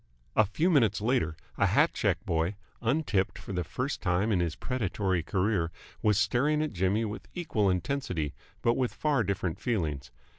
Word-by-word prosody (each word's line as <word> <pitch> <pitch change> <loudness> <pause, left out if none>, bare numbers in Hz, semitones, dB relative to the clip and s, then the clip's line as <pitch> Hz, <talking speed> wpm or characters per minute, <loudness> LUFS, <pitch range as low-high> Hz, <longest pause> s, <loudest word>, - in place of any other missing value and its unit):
A 110 - +6
few 160 - +1
minutes 115 - +4
later, 105 -9 +1 0.2
a - - +5
hat - - +4
check 95 -1 0
boy, 85 +1 0 0.3
untipped 115 -6 +1
for - - -7
the 90 -1 0
first 125 - -3
time 95 +4 +1
in 95 - +3
his 85 -2 0
predatory 100 -7 -1
career, 90 -1 0 0.3
was 105 -2 +3
staring 125 +9 +2
at 155 - -3
Jimmy 95 +5 +1
with 105 +1 -6
equal 115 - +1
intensity, 90 - -1 0.3
but 115 - +4
with 125 -1 -1
far 145 -6 +2
different 95 -4 -2
feelings. 75 - -1
105 Hz, 165 wpm, -29 LUFS, 90-120 Hz, 0.3 s, A